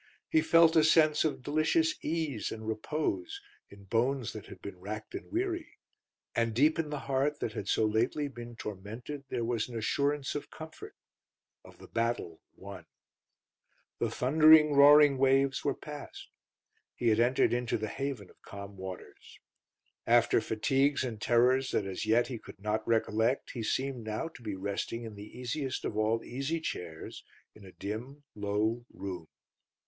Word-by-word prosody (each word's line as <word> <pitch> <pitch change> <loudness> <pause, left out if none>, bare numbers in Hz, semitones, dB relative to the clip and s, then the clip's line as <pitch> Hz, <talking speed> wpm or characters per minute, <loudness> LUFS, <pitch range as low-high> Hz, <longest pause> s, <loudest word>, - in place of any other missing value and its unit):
He 320 - +4
felt 165 - +5
a 160 - +6
sense 155 -1 +5
of 150 -5 -2
delicious 155 - +2
ease 155 -8 -2
and 110 0 -7
repose 155 - -2 0.3
in 100 0 -14
bones 120 +5 0
that - - -9
had - - -11
been 95 -2 -9
racked 105 +3 -7
and - - -7
weary, 345 0 -2 0.6
and 115 -1 +1
deep 150 +6 +4
in 155 -2 -1
the 150 -2 -4
heart 140 +2 0
that 110 - -3
had 100 - -5
so 110 - +2
lately 115 +7 +1
been 120 -3 -9
tormented 110 +8 -7
there 120 -2 -2
was 115 0 -1
an 120 - -5
assurance 140 +5 0
of 145 - -5
comfort 160 0 -10 0.7
of - - -16
the - - -13
battle 115 -8 -2
won. 95 -4 -10 1.1
The - - 0
thundering, 155 +2 +6
roaring 145 -1 +7
waves 135 +1 +3
were 140 -2 0
passed; 150 -1 -9 0.7
he 120 - +1
had 110 0 +3
entered 120 +2 +3
into 120 0 0
the 110 0 -3
haven 135 -5 -4
of - - -26
calm 100 0 -9
waters. 95 -1 -9 0.7
After - - +4
fatigues 135 +5 +1
and 115 -4 -5
terrors 125 +2 +3
that 100 - +1
as 95 +2 -4
yet 115 +2 +4
he 120 -2 -6
could - - -13
not 105 +2 -2
recollect 115 +2 +1
he 120 - -5
seemed 130 +2 -2
now 110 +9 -3
to 160 - -15
be 105 -4 -4
resting 100 +4 -3
in 110 -2 -7
the 105 +3 -11
easiest 130 +2 -3
of - - -3
all 110 +1 +1
easy 140 +6 -3
chairs 85 - -6 0.3
in 110 - -16
a 95 - -12
dim, 120 +10 -6
low 105 +3 -1
room. 90 -4 -6
120 Hz, 165 wpm, -31 LUFS, 110-145 Hz, 1.1 s, roaring